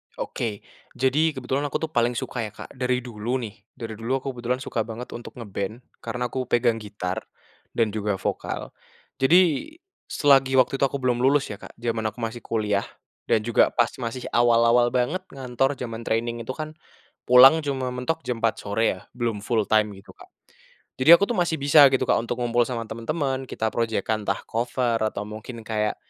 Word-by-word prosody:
Oke. 105 Hz, -4 st, -4 dB, 0.3 s
Jadi 145 Hz, +4 st, +2 dB
kebetulan 130 Hz, +3 st, -2 dB
aku -, -, -1 dB
tuh 160 Hz, -, -3 dB
paling 120 Hz, -2 st, +1 dB
suka 125 Hz, -3 st, -3 dB
ya, 105 Hz, -, -11 dB
Kak -, -, -10 dB
dari 125 Hz, -1 st, -1 dB
dulu 120 Hz, +1 st, -3 dB
nih, 105 Hz, -2 st, -6 dB, 0.2 s
dari 115 Hz, -1 st, -6 dB
dulu 125 Hz, +4 st, 0 dB
aku -, -, -6 dB
kebetulan 125 Hz, +1 st, -2 dB
suka 115 Hz, -, -2 dB
banget 115 Hz, +2 st, -7 dB
untuk 120 Hz, -, -9 dB
nge-band 105 Hz, +1 st, -5 dB, 0.2 s
karena 125 Hz, +2 st, -3 dB
aku 130 Hz, -2 st, -3 dB
pegang 120 Hz, -2 st, +2 dB
gitar 100 Hz, -3 st, -4 dB, 0.5 s
dan 115 Hz, -2 st, +2 dB
juga 105 Hz, -2 st, -1 dB
vokal. -, -, -4 dB, 0.5 s
Jadi 175 Hz, -, +3 dB, 0.3 s
selagi 135 Hz, -2 st, +3 dB
waktu 130 Hz, +1 st, +3 dB
itu 140 Hz, -, +4 dB
aku 140 Hz, -, -4 dB
belum 125 Hz, -1 st, +1 dB
lulus 135 Hz, 0 st, +2 dB
ya, 100 Hz, -, -7 dB
Kak, -, -, -12 dB
jaman 115 Hz, -2 st, -2 dB
aku 110 Hz, -, -18 dB
masih 115 Hz, +1 st, -3 dB
kuliah 105 Hz, -3 st, -1 dB, 0.4 s
dan 110 Hz, -, +2 dB
juga 120 Hz, 0 st, +4 dB
pas 120 Hz, -, +3 dB
masih 120 Hz, +1 st, -4 dB
awal-awal 120 Hz, 0 st, +4 dB
banget 125 Hz, +8 st, 0 dB, 0.2 s
ngantor 135 Hz, +1 st, 0 dB
jaman 115 Hz, -3 st, -6 dB
training 115 Hz, +1 st, -1 dB
itu 130 Hz, -, -4 dB
kan 155 Hz, -1 st, -5 dB, 0.5 s
pulang 135 Hz, +6 st, +7 dB
cuma 135 Hz, -3 st, -2 dB
mentok 125 Hz, +6 st, -2 dB
jam 120 Hz, -2 st, -3 dB
4:00 115 Hz, -1 st, +1 dB
sore 100 Hz, +2 st, -2 dB, 0.2 s
ya, -, -, -15 dB, 0.2 s
belum 115 Hz, -3 st, -1 dB
full 110 Hz, 0 st, 0 dB
time 105 Hz, -1 st, +2 dB
gitu, 95 Hz, -, -15 dB
Kak. -, -, -16 dB, 0.7 s
Jadi 160 Hz, +6 st, +9 dB
aku 200 Hz, -, +1 dB
tuh 225 Hz, -, -1 dB
masih 175 Hz, -2 st, +1 dB
bisa 145 Hz, 0 st, +7 dB
gitu, 130 Hz, -1 st, +1 dB
Kak, -, -, +2 dB
untuk 120 Hz, +1 st, -3 dB
ngumpul 120 Hz, 0 st, +2 dB
sama 120 Hz, -3 st, -3 dB
temen-temen, 130 Hz, +4 st, -3 dB
kita 110 Hz, -2 st, -2 dB
project-kan 110 Hz, -2 st, -1 dB
entah 100 Hz, -, -1 dB
cover 120 Hz, 0 st, -1 dB
atau 110 Hz, -1 st, -2 dB
mungkin 110 Hz, +2 st, -8 dB
kayak, 105 Hz, -1 st, -1 dB
120 Hz, 185 wpm, -24 LUFS, 110-130 Hz, 0.7 s, Jadi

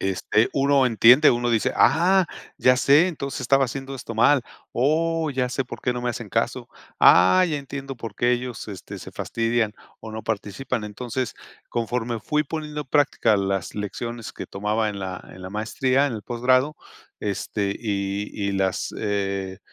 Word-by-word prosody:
este, 95 Hz, +4 st, +1 dB
uno 140 Hz, -1 st, +3 dB
entiende, 120 Hz, +3 st, +6 dB
uno 120 Hz, 0 st, 0 dB
dice: 115 Hz, -2 st, +1 dB
"Ah, 180 Hz, +3 st, +4 dB, 0.3 s
ya 130 Hz, 0 st, +5 dB
sé, 145 Hz, +7 st, +5 dB
entonces 140 Hz, -6 st, -5 dB
estaba 135 Hz, +2 st, +3 dB
haciendo 135 Hz, +2 st, -6 dB
esto 115 Hz, -2 st, -7 dB
mal, 130 Hz, +4 st, +4 dB, 0.3 s
oh, 160 Hz, +4 st, +1 dB
ya 130 Hz, -2 st, -1 dB
sé 130 Hz, +1 st, -2 dB
por 125 Hz, -, -9 dB
qué 125 Hz, -, 0 dB
no 125 Hz, -, -4 dB
me 120 Hz, -, 0 dB
hacen 120 Hz, -, -6 dB
caso, -, -, -1 dB, 0.3 s
ah, 95 Hz, -, +7 dB
ya 150 Hz, -, -1 dB
entiendo 135 Hz, -1 st, -6 dB
por 115 Hz, -3 st, -7 dB
qué 120 Hz, +4 st, +1 dB
ellos, 125 Hz, -2 st, -4 dB
este, 100 Hz, -3 st, -8 dB
se -, -, -9 dB
fastidian 115 Hz, -2 st, -1 dB, 0.3 s
o 110 Hz, 0 st, -9 dB
no 110 Hz, -, -6 dB
participan". 110 Hz, +3 st, -3 dB
Entonces, 120 Hz, +4 st, -4 dB, 0.3 s
conforme 120 Hz, 0 st, -2 dB
fui 150 Hz, +8 st, 0 dB
poniendo 150 Hz, 0 st, -5 dB
en 140 Hz, -, -22 dB
práctica 130 Hz, -7 st, +3 dB
las 95 Hz, -1 st, -2 dB
lecciones 115 Hz, +3 st, -5 dB
que -, -, -7 dB
tomaba 105 Hz, +2 st, -1 dB
en 100 Hz, -1 st, -7 dB
la 95 Hz, -1 st, -5 dB
en 90 Hz, -, -12 dB
la 95 Hz, -, -7 dB
maestría, 130 Hz, +6 st, +1 dB
en 140 Hz, -, -3 dB
el 110 Hz, -, -6 dB
posgrado, 130 Hz, +5 st, +1 dB, 0.4 s
este, 100 Hz, 0 st, -2 dB
y 100 Hz, -2 st, -2 dB, 0.2 s
y -, -, -1 dB
las, 95 Hz, -1 st, -1 dB
eh, 100 Hz, -2 st, -2 dB
120 Hz, 175 wpm, -24 LUFS, 105-135 Hz, 0.4 s, ah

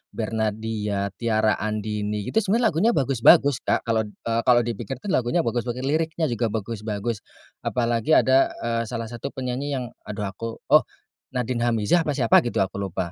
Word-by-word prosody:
Bernadya, 110 Hz, -2 st, -2 dB
Tiara 110 Hz, -2 st, +1 dB
Andini 105 Hz, -1 st, -2 dB
gitu 220 Hz, -, +1 dB
sebenarnya 225 Hz, +3 st, +2 dB
lagunya 195 Hz, +10 st, +3 dB
bagus-bagus 135 Hz, 0 st, +4 dB
Kak -, -, +2 dB
kalau, 110 Hz, -2 st, 0 dB
eee, 115 Hz, +2 st, -3 dB
kalau 120 Hz, -1 st, +6 dB
dipikir 120 Hz, +3 st, -4 dB
kan 200 Hz, -, -2 dB
lagunya 130 Hz, +7 st, +1 dB
bagus-bagus 120 Hz, +2 st, -2 dB
liriknya 160 Hz, 0 st, 0 dB
juga 115 Hz, 0 st, 0 dB
bagus-bagus. 110 Hz, 0 st, -3 dB, 0.4 s
Apalagi 120 Hz, +4 st, +1 dB
ada, 130 Hz, +1 st, +4 dB
eee, 115 Hz, 0 st, 0 dB
salah 115 Hz, -1 st, -5 dB
satu 120 Hz, +3 st, -5 dB
penyanyi 130 Hz, +2 st, -3 dB
yang 130 Hz, -, -2 dB, 0.2 s
aduh 105 Hz, 0 st, -4 dB
aku 115 Hz, +3 st, -6 dB, 0.2 s
oh, 150 Hz, -, +7 dB, 0.5 s
Nadin 125 Hz, -1 st, -1 dB
Amizah 115 Hz, +8 st, +2 dB
apa 145 Hz, -, 0 dB
siapa 115 Hz, -5 st, +5 dB
gitu 120 Hz, -5 st, 0 dB
aku 95 Hz, +1 st, -5 dB
lupa. 90 Hz, -3 st, -3 dB
115 Hz, 160 wpm, -24 LUFS, 110-130 Hz, 0.5 s, oh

